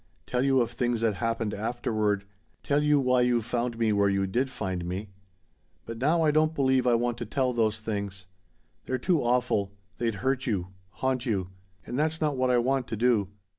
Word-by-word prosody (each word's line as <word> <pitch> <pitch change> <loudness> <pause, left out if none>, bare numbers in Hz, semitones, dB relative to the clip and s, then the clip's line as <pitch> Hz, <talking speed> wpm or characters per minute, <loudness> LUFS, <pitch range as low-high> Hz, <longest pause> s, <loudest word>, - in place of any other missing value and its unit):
Tell 125 - -1
you 135 -1 +3
of 120 - -1
things 120 -2 -1
that 110 -3 +1
happened 115 -2 -1
afterward 110 -2 -1 0.4
tell 145 +1 +2
you 150 -1 +4
why 125 -1 +3
you 125 -1 +3
found 120 +1 -2
me 115 -2 +2
where 100 0 +3
you 100 0 +1
did 120 +8 0
find 95 -8 -3
me. 95 +4 -4 0.8
But 115 0 -7
now 160 +6 +2
I 155 - +4
don't 155 +1 +2
believe 130 -3 +2
I 120 - +5
want 120 0 -1
to 120 - -3
tell 130 +1 0
those 110 -2 +1
things. 100 -3 -4 0.6
They're 130 - -1
too 160 +5 +1
awful. 120 -5 +1 0.3
They'd 115 -2 0
hurt 135 0 0
you 95 -6 -1 0.2
haunt 130 +7 -2
you. 95 -5 -1 0.3
And 125 - -3
that's 160 +1 +1
not 150 -3 0
what 130 0 +1
I 125 - +4
want 130 +1 +1
to 110 - -4
do. 115 -4 +2
120 Hz, 200 wpm, -27 LUFS, 105-130 Hz, 0.8 s, I